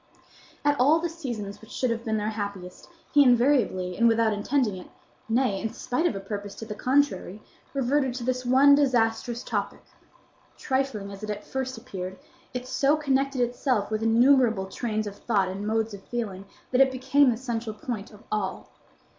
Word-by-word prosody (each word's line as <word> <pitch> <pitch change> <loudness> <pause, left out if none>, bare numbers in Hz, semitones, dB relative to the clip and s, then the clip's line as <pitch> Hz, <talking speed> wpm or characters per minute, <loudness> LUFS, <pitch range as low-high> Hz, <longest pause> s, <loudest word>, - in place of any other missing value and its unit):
At 290 0 +2
all 290 +6 +5
the 340 +1 -2
seasons 225 -11 -6
which 220 - -14
should 255 -2 -1
have 230 0 -3
been 220 -1 -1
their 210 +1 -1
happiest, 200 - -6 0.2
he 290 - +7
invariably 245 -8 +3
and 235 - +4
without 225 -1 +3
intending 210 0 0
it, 180 - -10 0.4
nay, 225 -4 +1
in 225 - -2
spite 270 +7 -1
of 225 - -2
a - - -3
purpose 200 0 -6
to 225 - -7
the 215 - -5
contrary, 250 -6 0 0.4
reverted 265 -1 +1
to 250 - -4
this 255 +1 -1
one 265 +3 +6
disastrous 240 -4 +1
topic. - - -3 0.7
Trifling 260 -7 -2
as 200 0 -10
it 215 - -6
at 210 0 -4
first 260 -1 -4
appeared, 190 -6 -7 0.3
it 250 0 -5
so 280 +3 +2
connected 275 -2 0
itself 245 -3 0
with 215 0 -1
innumerable 230 -2 +4
trains 215 +2 -3
of 205 -1 -7
thought 200 -5 +1
and 195 +2 -5
modes 220 0 0
of 200 - -8
feeling 205 -5 -4 0.3
that 255 +1 +4
it 265 -1 +5
became 265 +2 +3
the 230 - 0
central 230 -3 -4
point 215 -2 -5
of 210 -1 -16
all. 200 -3 -3
230 Hz, 180 wpm, -26 LUFS, 210-260 Hz, 0.7 s, he